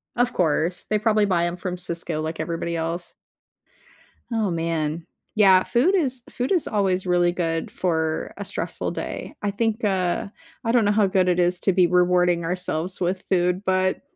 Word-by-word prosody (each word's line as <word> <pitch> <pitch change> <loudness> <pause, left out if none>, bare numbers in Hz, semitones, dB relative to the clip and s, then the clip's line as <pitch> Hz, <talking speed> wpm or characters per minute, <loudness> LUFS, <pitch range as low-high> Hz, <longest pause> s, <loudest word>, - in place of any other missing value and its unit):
Of 245 +1 +1
course. 170 +1 0
They 215 -1 0
probably 215 -1 +3
buy 175 -3 +1
'em 175 0 -2
from 180 0 -4
Sysco 170 -3 -3
like 160 +1 -4
everybody 170 +1 -3
else. 165 +2 -4 1.2
Oh, 220 -4 0
man. 165 -1 -2 0.3
Yeah. 190 -3 +6
Food 290 +12 +2
is 260 -9 +1
Food 250 +1 -3
is 360 -5 +2
always 190 -3 0
really 175 -1 +3
good 165 -2 -2
for 160 -3 -1
a - - -4
stressful - - -3
day. - - -6
I 205 - 0
think, 225 +2 -1
uh 185 -3 0 0.4
I 230 - +2
don't 240 - +4
know 205 - +3
how 210 -1 +3
good 185 -1 +2
it 180 - +1
is 175 0 +2
to 195 - +2
be 180 -2 +4
rewarding 180 -1 +3
ourselves 180 0 -2
with 185 +1 -1
food, 180 +1 +1
but 185 0 +1
180 Hz, 180 wpm, -23 LUFS, 170-205 Hz, 1.2 s, Yeah